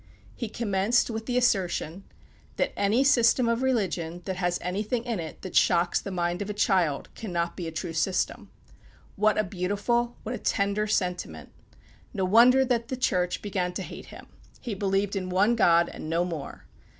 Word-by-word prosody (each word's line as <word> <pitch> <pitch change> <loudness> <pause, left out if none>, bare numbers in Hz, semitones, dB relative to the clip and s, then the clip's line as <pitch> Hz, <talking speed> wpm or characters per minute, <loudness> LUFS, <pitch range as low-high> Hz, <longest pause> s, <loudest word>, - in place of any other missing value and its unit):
He 235 - -5
commenced 215 +2 +1
with 220 0 -5
the 250 -1 0
assertion, 190 -6 0 0.5
"That - - -1
any 210 +6 +2
system 250 -2 +4
of 230 +1 +1
religion 180 -9 -1
that 190 -1 -3
has 175 -1 0
anything 210 +6 -2
in 235 -5 -3
it 160 -2 -8
that 185 - -7
shocks 175 0 +3
the - - -6
mind 175 -1 -2
of 205 - -4
a 210 - -4
child 180 -8 +1
cannot 170 -5 -3
be 175 -3 -5
a - - -4
true 165 +1 -5
system." 180 +4 -1 0.7
What 215 +2 +2
a 215 - +3
beautiful, 205 +6 -1
what 225 - -4
a - - -4
tender 200 +2 0
sentiment! 180 -4 -2 0.6
No 190 -2 0
wonder 245 +7 +6
that 235 -2 0
the 260 - -4
Church 180 -7 0
began 185 -3 -2
to 190 - -4
hate - - -9
him. - - -12 0.3
He 235 - -5
believed 195 0 0
in 185 -1 -3
one 200 +6 +3
God, 170 -5 +4
and 155 - -8
no 170 +2 +1
more. 165 -5 -7
195 Hz, 180 wpm, -27 LUFS, 180-230 Hz, 0.7 s, wonder